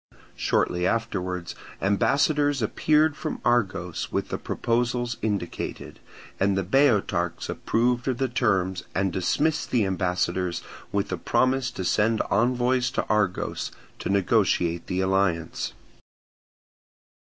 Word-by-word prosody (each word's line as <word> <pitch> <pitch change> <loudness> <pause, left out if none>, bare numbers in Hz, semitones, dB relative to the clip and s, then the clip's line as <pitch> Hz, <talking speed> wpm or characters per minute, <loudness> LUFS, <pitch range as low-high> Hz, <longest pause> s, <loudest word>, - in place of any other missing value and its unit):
Shortly 90 +1 +1
afterwards 90 -6 -2 0.3
ambassadors 140 +7 +2
appeared 155 +6 +2
from 155 0 -4
Argos 95 -8 0
with - - -2
the - - -3
proposals 120 0 -1
indicated; 100 -5 -4 0.4
and 95 0 +2
the 95 - +1
Boeotarchs 100 - +1
approved 120 +2 0
of 130 -2 0
the 135 - +1
terms 95 -7 0
and 95 -1 +1
dismissed 150 - 0
the 115 -5 +2
ambassadors 90 -1 -1 0.3
with 100 -1 -1
a 95 - -1
promise 130 +7 +1
to 95 - -5
send 110 +4 +2
envoys 120 +3 +2
to - - -2
Argos 100 -4 0 0.3
to - - -4
negotiate 95 -4 +2
the 90 +1 -1
alliance. 95 -3 0
105 Hz, 115 wpm, -25 LUFS, 95-125 Hz, 0.4 s, ambassadors